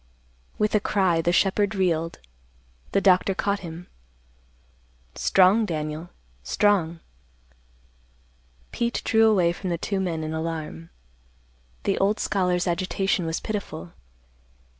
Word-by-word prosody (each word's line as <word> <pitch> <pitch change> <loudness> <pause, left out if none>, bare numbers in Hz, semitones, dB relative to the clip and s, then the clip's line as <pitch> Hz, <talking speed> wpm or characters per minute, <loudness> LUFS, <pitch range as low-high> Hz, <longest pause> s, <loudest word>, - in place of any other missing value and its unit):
With 210 0 +1
a 210 - +4
cry 190 -5 +1
the 170 - +1
shepherd 200 +3 +2
reeled. 165 -3 0 0.7
The 195 - +2
doctor 190 0 +4
caught 200 +1 0
him. 170 -1 -8 1.3
"Strong, 195 - +4
Daniel, 155 0 -4 0.3
strong." 170 - +1 1.7
Pete 235 0 -2
drew 225 -1 +5
away 180 -5 +3
from 185 +1 -5
the 170 - -1
two 195 +4 -2
men 170 -4 -2
in 155 0 -4
alarm. 160 - -5 0.9
The - - 0
old 200 +2 +2
scholar's 180 -2 0
agitation 185 0 0
was 160 - -2
pitiful. 200 - -5
180 Hz, 115 wpm, -25 LUFS, 165-200 Hz, 1.7 s, drew